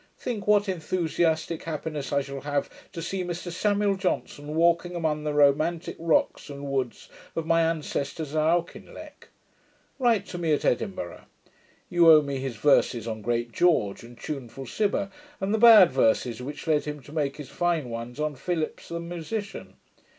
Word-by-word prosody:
Think 215 -5 -4
what 205 0 +4
enthusiastick 165 -2 -1
happiness 155 -3 -5
I 140 0 +2
shall 140 0 -7
have 145 -1 -2 0.2
to 165 - -6
see 185 +3 -3
Mr 175 0 -5
Samuel 205 +2 +1
Johnson 155 -5 -3
walking 170 +1 +2
among 155 -3 -1
the 150 - 0
romantick 155 +4 +2
rocks 165 -2 +1
and 140 0 -7
woods 130 -3 -2 0.3
of 165 - -2
my 165 0 +3
ancestors 155 -2 -2
at 155 - +2
Auchinleck! 170 +2 -3 0.7
Write 230 -6 +2
to 175 - -7
me 165 -3 +1
at 145 - 0
Edinburgh. 95 -6 -2 0.6
You 170 -1 +5
owe 155 -1 +7
me 140 -1 -3
his 130 -2 -4
verses 120 -2 +2
on 110 -1 -4
great 120 +1 -1
George 135 - +2
and 120 0 -13
tuneful 135 -2 -6
Cibber, 200 - -1 0.3
and 195 +2 -1
the 220 - +1
bad 220 -6 +9
verses 120 -2 +1
which 145 +3 -7
led 155 -2 +1
him 150 0 -5
to 145 - -13
make 145 -3 -1
his 145 -3 -8
fine 170 -6 0
ones 115 +3 -6
on 150 -1 -1
Philips 160 +3 -3
the 170 - -4
musician. 175 +5 -6
155 Hz, 165 wpm, -26 LUFS, 140-175 Hz, 0.7 s, bad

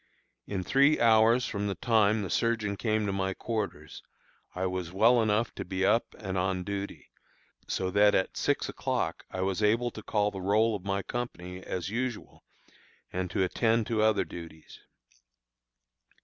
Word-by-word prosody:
In 95 -2 -3
three 140 - +4
hours 115 +1 +5
from 105 -1 -3
the 100 - -2
time 110 +1 +2
the 95 - -4
surgeon 110 -3 0
came 110 0 0
to 100 - -1
my 95 -1 -1
quarters, 105 -10 -4 0.5
I 90 +1 -1
was 90 -2 -3
well 115 +5 +4
enough 110 +1 +1
to - - -5
be 95 +1 -1
up 115 +4 +1
and 95 -2 -3
on 95 0 -1
duty, 100 +1 -6 0.6
so 95 -1 -1
that 105 +1 +5
at 95 - 0
six - - 0
o'clock - - -2
I 95 - -4
was 95 +1 -1
able 115 +3 +2
to 110 - -9
call 105 -1 0
the 95 -2 -6
roll 105 +4 +2
of 95 - -7
my 100 0 -1
company 90 -7 -5
as 95 +1 -4
usual, 120 0 -4 0.7
and 90 0 -2
to 95 - 0
attend 115 +4 +1
to 110 -1 0
other 110 -2 +3
duties. 80 -2 -11
105 Hz, 165 wpm, -29 LUFS, 95-110 Hz, 0.7 s, hours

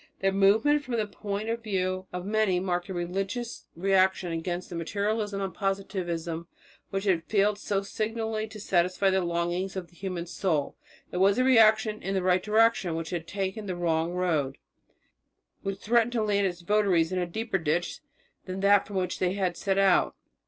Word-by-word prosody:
Their 195 0 +2
movement 215 +10 +4
from 255 -4 -3
the 220 -2 +1
point 205 +1 -5
of 230 +1 -2
view 185 -3 -2
of 180 0 -5
many 210 -3 +2
marked 180 0 -2
a - - -3
religious 195 +7 -3
reaction 190 0 +2
against 175 +2 -3
the - - -5
materialism 205 +4 -1
and 190 -3 -3
positivism 175 -4 -3 0.4
which 195 -1 -2
had 185 -5 +2
failed 205 0 +2
so 200 -2 -1
signally 220 +1 -2
to 215 0 -10
satisfy 185 0 +2
longings 175 0 -1
of 185 -3 -5
the 175 - -23
human 180 -2 -4
soul. 165 -4 -1 0.4
It - - -4
was 195 +2 +4
a 255 - +3
reaction 220 -3 +4
in 195 +1 -2
the 190 - 0
right 185 0 +3
direction 215 -5 +3
which 165 0 -4
had 170 -2 -4
taken 195 +3 -3
the 185 - -2
wrong 165 -1 0
road, 160 -7 0 1.0
which 195 0 -3
threatened 235 +3 +2
to 225 -3 +1
land 200 -2 +2
its 175 -1 -5
votaries 185 -3 +2
in 185 - 0
a 175 - -1
deeper 220 +2 -2
ditch 165 +2 -1 0.5
than 185 0 -5
that 200 0 +4
from 200 - -8
which 185 -1 -1
they 180 0 +1
had 185 -3 -1
set 195 +1 -1
out. 195 -2 +3
195 Hz, 180 wpm, -28 LUFS, 175-210 Hz, 1.0 s, movement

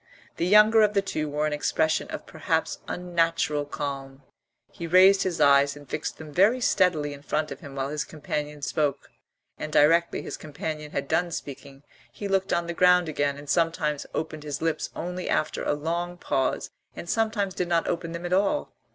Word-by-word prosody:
The 170 - 0
younger 210 +3 +6
of 210 -1 +3
the 200 - +3
two 155 -6 -3
wore 150 +1 -1
an 155 - -1
expression 155 +1 0
of - - -6
perhaps - - -2
unnatural 165 -4 0
calm; 135 -2 -6 0.5
he 170 - -6
raised 190 +3 +6
his 180 -3 -1
eyes 140 0 +5
and 145 -1 -13
fixed - - -4
them 155 -1 -10
very 210 - +4
steadily 170 -10 +2
in 140 - -11
front 150 +1 -2
of 140 - -7
him 140 -1 -10
while 135 0 -2
his 150 +1 -2
companion 150 -1 -5
spoke, 145 -2 -1 0.5
and 155 - -5
directly 165 +3 +3
his - - -6
companion 150 0 -6
had 140 - -3
done 175 +4 +1
speaking 140 -3 -8 0.3
he 205 - -6
looked 195 0 0
on 170 0 +1
the 170 - -4
ground 180 -1 +4
again 145 -2 -1
and 145 0 -11
sometimes 160 -2 0
opened 155 -1 -4
his 150 -1 -5
lips 160 -1 -1
only 180 +2 -4
after 155 - 0
a - - +1
long 170 +4 -3
pause 135 -6 -1 0.2
and - - -8
sometimes 215 -2 0
did 180 - -2
not 170 -1 +1
open 170 -1 -2
them 170 +1 -6
at 175 - -1
all. 200 +9 +1
160 Hz, 190 wpm, -26 LUFS, 145-180 Hz, 0.5 s, younger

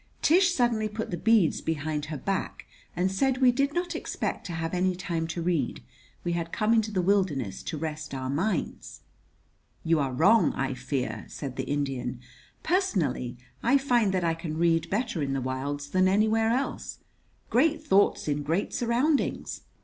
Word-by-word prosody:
Tish 355 +3 +5
suddenly 240 -8 +1
put 220 +1 -5
the - - -1
beads 210 -2 +3
behind 155 -1 -2
her 155 -1 -5
back 195 +6 -3 0.3
and 180 +2 +1
said 260 +6 +1
we 255 -1 +5
did 275 +3 +1
not 345 +1 -2
expect 325 - -3
to 175 - -5
have 165 +1 -3
any 185 0 +1
time 170 -2 -2
to 165 +1 -4
read. 165 -8 -1 0.4
We 175 - -1
had 170 -1 -2
come 215 +1 +2
into 220 -1 +2
the 190 -4 0
wilderness 165 - +1
to 160 - -5
rest 155 -2 -5
our 130 -1 -3
minds. 170 +7 -2 0.8
"You 165 -1 +2
are 135 -2 0
wrong, 180 - +4
I 135 0 -1
fear," 130 0 -3
said 135 -3 -6
the 130 -1 -4
Indian. 135 -4 -2 0.4
"Personally 180 - 0 0.2
I 260 +4 +4
find 245 -7 +2
that 185 -2 0
I 165 -1 +2
can 165 -1 -5
read 165 -1 +2
better 220 -4 -1
in 135 -1 -1
the 135 - 0
wilds 140 +3 -3
than 185 0 +4
anywhere 220 +3 +3
else. 255 +4 -2 0.5
Great 310 +5 +2
thoughts 205 - +3
in 145 0 0
great 165 +7 -1
surroundings! 250 +6 0
175 Hz, 170 wpm, -27 LUFS, 150-225 Hz, 0.8 s, Tish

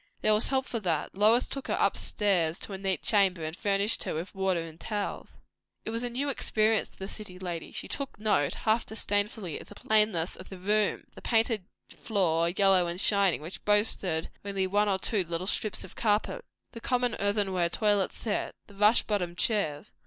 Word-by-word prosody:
There 215 - +4
was 210 - +2
help 265 -1 0
for 235 - -3
that; 170 -7 -1
Lois 215 +5 +4
took 275 -1 -5
her - - 0
upstairs 180 -6 +1
to 200 - -8
a - - -4
neat 190 -3 -1
chamber, 190 -5 +3
and 155 +1 -4
furnished 200 +1 +1
her - - -2
with 165 +4 -5
water 190 -3 0
and 165 0 -9
towels. 205 +1 -4 0.5
It 220 - -3
was 230 +1 -2
new 245 +3 -2
experience 220 -5 +1
to - - -25
the 190 - -6
city 200 -3 -8
lady. 175 -3 -5
She - - -6
took 280 -6 -5
note, 205 -10 +1
half 220 +1 +1
disdainfully, 205 -4 -2
of - - -13
the - - -12
plainness 210 -6 +2
of 185 - -11
the 190 - -8
room; 205 +3 +1
the - - -12
painted 225 -4 +2 0.3
floor, 170 -6 +1
yellow 190 -1 +4
and 170 +1 -3
shining, 200 -6 +3
which 170 +4 -8
boasted 205 -6 +1
only 195 -1 -1
one 205 +2 +2
or 195 - +2
two 200 0 0
little 170 +1 -3
strips 210 +1 0
of - - -12
carpet; 220 - 0 0.3
the 230 - -9
common 245 -1 0
earthenware 195 -4 +1
toilet 205 0 +2
set; 215 -3 -3
the 205 - -17
rush 210 +3 +4
bottomed 180 -5 -2
chairs. 160 -11 0
200 Hz, 190 wpm, -29 LUFS, 180-215 Hz, 0.5 s, There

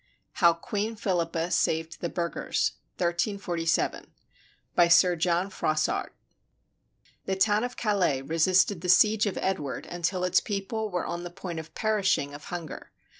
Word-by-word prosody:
HOW 170 -1 +7
QUEEN 215 +4 -3
PHILIPPA 175 -5 -1
SAVED 160 +1 0
THE 170 - -2
BURGHERS 170 0 -1 0.3
BY 175 -1 -1
SIR 175 +1 +5
JOHN 175 +3 0
FROISSART 155 -4 -1 1.1
[The 190 - 0
town 210 +3 +2
of 245 0 -4
Calais 185 - +1
resisted 165 +5 +2
the 180 - -3
siege 210 +3 +5
of 200 - -3
Edward 170 -8 -2
until 175 +1 -2
its 180 0 +4
people 215 +1 -3
were 180 -3 -2
on 170 0 -4
the 175 - -5
point 175 -1 -6
of 160 0 -11
perishing 195 -9 +1
of 145 +1 -10
hunger. 170 -4 -7
180 Hz, 135 wpm, -27 LUFS, 165-200 Hz, 1.1 s, HOW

